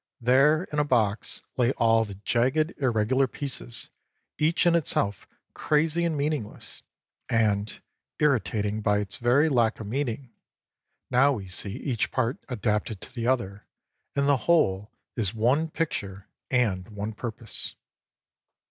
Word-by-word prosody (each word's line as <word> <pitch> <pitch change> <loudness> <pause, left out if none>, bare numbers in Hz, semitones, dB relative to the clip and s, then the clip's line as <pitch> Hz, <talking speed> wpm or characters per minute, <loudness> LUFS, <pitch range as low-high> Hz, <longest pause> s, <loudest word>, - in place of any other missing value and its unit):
There 135 +7 +4
in 150 - +1
a - - +4
box 115 -7 0
lay 125 +1 +3
all 115 -1 +3
the 100 -2 -8
jagged, 130 - +1
irregular 130 +1 +2
pieces, 125 - -5 0.5
each 160 +4 +2
in 175 - +5
itself 105 - 0 0.3
crazy 160 +3 +1
and 160 -3 0
meaningless 145 -6 -4 0.5
and 105 -2 +1 0.4
irritating 110 -7 +1
by 105 0 +2
its 100 -1 -2
very 125 +6 +3
lack 120 -6 +2
of 110 - -6
meaning: 125 +1 -3 0.8
now 135 +3 +5
we 100 -7 -5
see 95 +2 -3
each 125 -2 -1
part 125 -1 0
adapted 105 -3 -1
to - - -11
the 120 -2 -3
other 105 -6 -1 0.5
and 140 0 +2
the 140 -1 +4
whole 105 - +3 0.3
is 105 -2 -1
one 130 +9 +2
picture 100 -12 -3 0.2
and 110 -6 +1
one 105 +1 -5
purpose. 110 +1 -4
120 Hz, 135 wpm, -26 LUFS, 105-140 Hz, 0.8 s, in